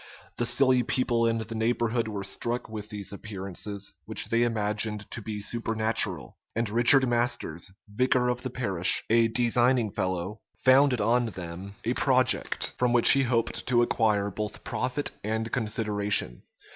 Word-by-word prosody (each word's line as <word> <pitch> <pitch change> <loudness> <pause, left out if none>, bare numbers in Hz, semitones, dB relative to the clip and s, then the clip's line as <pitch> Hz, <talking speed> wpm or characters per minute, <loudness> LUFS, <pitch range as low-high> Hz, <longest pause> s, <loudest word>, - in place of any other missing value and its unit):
The 120 - -1
silly 130 +1 +3
people 120 -2 0
in 115 0 0
the 115 0 -6
neighborhood 115 +1 -1
were 105 -2 -5
struck 120 +5 -2
with 110 -1 -8
these 105 -2 -5
appearances, 100 0 -5
which - - 0
they 115 0 +1
imagined 105 -2 -1
to 120 - -5
be 105 0 -6
supernatural; 110 0 -1 0.2
and 115 +1 -1
Richard 125 +4 +5
Masters, 120 -8 -1 0.2
vicar 125 +3 +1
of 125 0 -2
the 130 - -4
parish, 95 -8 +1
a 115 0 +4
designing 120 0 +2
fellow, 95 +3 -3 0.2
founded 130 -2 +3
on 120 +3 +1
them 95 0 -8
a 120 - 0
project, 130 -1 +2
from 125 -1 +1
which 120 -1 +7
he 135 - +5
hoped 120 -3 -1
to 120 -1 +3
acquire 105 -4 0
both 105 +2 -6
profit 125 +3 -2
and 110 +2 -3
consideration. 105 - 0
115 Hz, 150 wpm, -26 LUFS, 105-120 Hz, 0.2 s, which